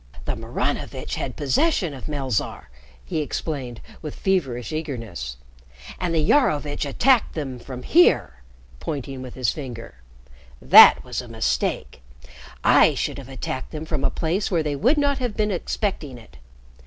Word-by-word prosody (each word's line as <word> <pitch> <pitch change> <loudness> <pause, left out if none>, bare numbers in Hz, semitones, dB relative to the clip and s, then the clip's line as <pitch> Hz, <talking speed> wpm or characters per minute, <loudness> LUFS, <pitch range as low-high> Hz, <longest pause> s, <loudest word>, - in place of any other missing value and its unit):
"The - - -2
Maranovitch - - -3
had - - -4
possession 165 - +1
of 130 - -8
Melzarr," 130 - -3 0.3
he 155 - -2
explained 140 -5 -4 0.2
with 150 -2 -6
feverish 140 - -1
eagerness. 115 - -5 0.6
"And 175 -2 -1
the 155 -2 +2
Iarovitch 150 - +2
attacked 250 - +3
them 135 -5 -4
from 125 +1 -8
here," 70 - +3 0.4
pointing 135 - -5
with 130 -2 -9
his 125 -3 +1
finger. 120 - -8 0.6
"That - - +9
was - - -4
a - - -11
mistake. 65 0 -2 0.6
I - - +5
should - - -2
have 135 -1 -10
attacked 130 0 -5
them 155 0 -6
from 155 -3 -2
a 135 - +3
place 170 +8 -1
where 165 -3 +1
they 150 -1 -2
would 250 - +2
not 285 -1 +1
have 245 -5 -3
been 210 -1 +1
expecting 175 - -3
it. 65 - -16
145 Hz, 150 wpm, -23 LUFS, 125-170 Hz, 0.6 s, That